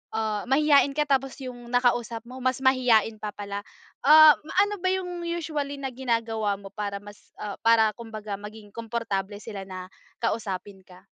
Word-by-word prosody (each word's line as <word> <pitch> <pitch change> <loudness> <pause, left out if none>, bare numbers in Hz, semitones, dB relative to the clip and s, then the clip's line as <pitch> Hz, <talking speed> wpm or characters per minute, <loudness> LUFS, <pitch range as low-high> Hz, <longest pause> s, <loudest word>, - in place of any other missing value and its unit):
ah, 215 -2 -1
mahiyain 285 0 +5
ka 300 - +2
tapos 270 -1 +1
yung 245 -2 -8
nakausap 240 -2 +1
mo 255 +1 -9
mas 255 0 0
mahiyain 245 -4 +4
pa 210 0 -4
pala. 200 0 -5 0.4
Ah, 310 +2 +9
ma 305 - -10
ano 410 0 -2
ba 370 - 0
yung 360 -2 -3
usually 310 -4 -3
na 270 -1 -4
ginagawa 230 -4 -1
mo 195 0 -11
para 205 -1 -3
mas, 205 0 -14
ah, 205 -1 -5
para 225 -1 +5
kumbaga 215 -2 -7
maging 210 0 -11
komportable 220 -4 -3
sila 205 -4 -6
na 185 -1 -7 0.4
kausapin 200 -3 -3
ka? 180 0 -16
230 Hz, 165 wpm, -26 LUFS, 210-270 Hz, 0.4 s, Ah